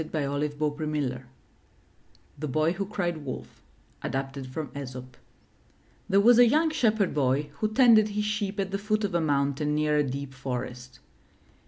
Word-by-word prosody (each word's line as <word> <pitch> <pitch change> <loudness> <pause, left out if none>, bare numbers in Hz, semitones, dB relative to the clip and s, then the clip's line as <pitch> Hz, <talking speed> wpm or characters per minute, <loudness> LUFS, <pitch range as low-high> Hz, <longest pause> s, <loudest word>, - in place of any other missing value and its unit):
•; - - -1
MY 145 -2 -1
BOOK 145 0 -3
HOUSE 145 -5 -2 1.2
THE 150 - -3
BOY 155 +4 +1
WHO 195 +2 -3
CRIED 175 -5 -2
WOLF 135 -4 -8 0.4
Adapted 135 0 -4
from 140 +1 -5
Aesop 130 -2 -7 0.9
There 195 - +4
was 235 +3 +6
a 245 - +8
young 315 +6 +3
Shepherd 220 -8 +1
Boy 140 +1 +1
who 215 0 0
tended 220 -3 +6
his 210 0 -2
sheep 210 -1 -2
at 195 -1 -1
the 195 - -2
foot 215 +1 0
of 200 -3 -1
a 170 - +2
mountain 145 0 0
near 150 0 +2
a 150 - +3
deep 140 0 -5
forest. 125 -1 -6
150 Hz, 165 wpm, -27 LUFS, 140-205 Hz, 1.2 s, a